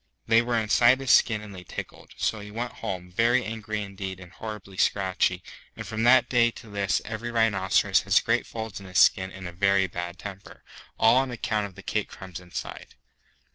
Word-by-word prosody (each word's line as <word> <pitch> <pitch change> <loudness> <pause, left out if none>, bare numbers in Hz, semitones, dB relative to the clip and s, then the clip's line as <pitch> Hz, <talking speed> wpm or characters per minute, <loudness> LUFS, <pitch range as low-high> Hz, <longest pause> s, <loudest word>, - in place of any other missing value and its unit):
They 115 +1 +5
were 120 0 -1
inside 120 +3 +4
his 135 -2 0
skin 110 -3 +4
and 105 -1 -10
they 90 -1 -9
tickled. - - -9
So 110 - -1
he 105 0 -9
went 120 +3 -4
home, 90 -1 -5
very 120 +6 +2
angry 110 -1 -4
indeed 95 -2 -6
and 90 -2 -12
horribly 105 -3 -8
scratchy; 95 -2 +1 0.3
and - - -7
from 110 0 -4
that 130 +2 +6
day 120 -2 +4
to 115 -2 -12
this 100 -1 0
every 115 +2 -5
rhinoceros 110 -5 +2
has - - +4
great - - 0
folds 110 -3 -6
in 95 - -11
his 90 - -3
skin 95 0 +4
and 95 -1 -8
a - - -6
very 100 +2 +2
bad 85 -1 -5
temper, 100 -1 -10 0.3
all 115 +2 +5
on 135 0 +2
account 110 -3 -2
of 95 - -16
the 100 - -12
cake 105 -1 -2
crumbs 95 -3 -9
inside. 90 -1 -8
105 Hz, 200 wpm, -26 LUFS, 95-115 Hz, 0.3 s, that